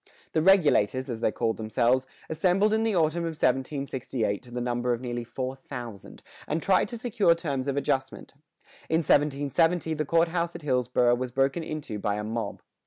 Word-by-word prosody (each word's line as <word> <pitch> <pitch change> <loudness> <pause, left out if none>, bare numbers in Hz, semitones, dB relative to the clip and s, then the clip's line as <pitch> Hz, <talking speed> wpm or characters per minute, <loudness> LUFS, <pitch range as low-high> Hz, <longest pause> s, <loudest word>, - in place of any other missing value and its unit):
The 160 - +2
Regulators, 145 - +3
as 115 -1 -5
they - - +2
called 115 0 -1
themselves, 120 +4 +1 0.2
assembled 185 +6 +2
in 220 - +2
the 225 -2 +1
autumn 165 0 +2
of 165 -2 -3
1768 130 -5 -1
to 125 - -16
the 120 +1 -4
number 120 0 0
of 120 - -3
nearly 120 -1 -4
four 130 +2 -4
thousand, 120 -6 -9 0.2
and 155 - 0
tried 185 +3 +2
to 240 - -6
secure 220 -7 +2
terms 140 -6 -3
of 140 0 -1
adjustment. 135 -1 -2 0.6
In 160 +1 +2
1770 150 +4 +2
the 155 0 -1
court 165 +3 +2
house 170 0 -2
at - - -8
Hillsboro 125 -3 +2
was 125 +1 -2
broken 135 +5 +1
into 150 -9 -5
by 100 0 -1
a 105 - -3
mob. 110 -1 -4
135 Hz, 180 wpm, -27 LUFS, 120-165 Hz, 0.6 s, Regulators